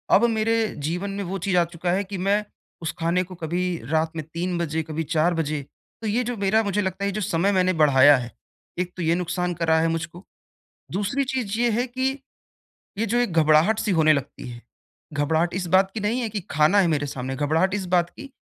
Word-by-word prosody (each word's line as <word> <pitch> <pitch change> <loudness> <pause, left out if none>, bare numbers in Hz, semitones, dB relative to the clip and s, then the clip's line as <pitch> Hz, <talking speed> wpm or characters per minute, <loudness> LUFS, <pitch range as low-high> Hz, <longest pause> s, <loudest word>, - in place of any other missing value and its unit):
अब 225 - +5
मेरे 225 0 +1 0.3
जीवन 180 +5 -2
में - - -2
वो 190 +1 -4
चीज़ 190 -2 +1
आ 175 - +5
चुका 175 +1 -2
है 190 +3 +1
कि 195 0 -6
मैं 205 +1 +2 0.4
उस 160 -1 -2
खाने 170 +2 +1
को 185 0 -11
कभी 170 +3 -1 0.3
रात 160 +1 0
में 155 - -3
3 175 +1 -2
बजे, 160 -1 -1
कभी 155 +1 -4
4 160 +3 +1
बजे 155 -3 -2 0.4
तो 225 - -3
ये 230 +4 +1
जो 245 +1 -3
मेरा 215 +3 +3
मुझे 205 0 0
लगता 190 0 -3
है - - +1
ये - - -2
जो 215 - -2
समय 180 +1 +1
मैंने 185 -1 +2
बढ़ाया 145 -1 +7
है, 120 -1 -6 0.5
एक 180 0 -2
तो - - -4
ये 165 +1 +2
नुकसान 180 0 -2
कर 165 -1 -3
रहा 160 0 +4
है 165 - +2
मुझको। 170 +2 -6 0.7
दूसरी 205 +8 0
चीज़ 225 -5 -2
ये 240 0 +3
है 240 +3 0
कि 260 +1 -1 0.9
ये 225 - 0
जो 230 +2 0
एक 245 -5 0
घबराहट-सी 160 +8 +3
होने 155 0 +6
लगती 140 -3 -4
है। 120 -1 -9 0.5
घबराहट 160 +4 +1
इस 185 -1 -3
बात 190 0 +4
की 220 - -3
नहीं 220 +5 0
है 230 - -2
कि 210 0 -3
खाना 155 +7 +4
है 190 - +4
मेरे 150 -3 0
सामने, 130 -1 -4
घबराहट 160 +7 +1
इस 205 -2 -2
बात 175 -1 +2
की 280 - -11
180 Hz, 230 wpm, -24 LUFS, 160-205 Hz, 0.9 s, बढ़ाया